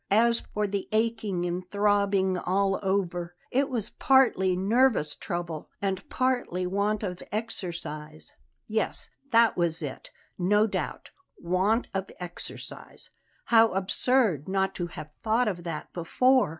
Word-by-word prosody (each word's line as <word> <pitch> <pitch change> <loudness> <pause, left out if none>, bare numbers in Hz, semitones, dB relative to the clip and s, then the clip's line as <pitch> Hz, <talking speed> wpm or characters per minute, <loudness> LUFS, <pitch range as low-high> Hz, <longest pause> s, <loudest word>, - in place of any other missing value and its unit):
As 230 +3 +4
for 210 0 0
the 200 -1 -3
aching 215 -5 0
and 175 +1 -2
throbbing 200 -2 +2
all 195 +2 +1
over, 180 -3 -1 0.2
it 275 +2 +2
was 235 -6 -2
partly 240 -9 +4
nervous 205 - +3
trouble 170 -3 -5
and 195 -1 -2
partly 245 -8 0
want 200 +3 0
of 180 -3 -4
exercise. 170 -8 -5 0.3
Yes, 220 0 -2 0.2
that 230 -2 +5
was 170 -2 0
it, 140 -3 -6 0.3
no 205 +4 +4
doubt; 220 - -4 0.3
want 190 +7 +1
of 195 0 -2
exercise. 180 -1 -7 0.4
How 225 -2 +7
absurd 195 - +1
not 190 0 +1
to 175 -2 -3
have 155 -2 -9
thought 230 +3 +2
of 175 -4 -2
that 165 -3 -5
before! 255 - +3
195 Hz, 130 wpm, -27 LUFS, 175-220 Hz, 0.4 s, How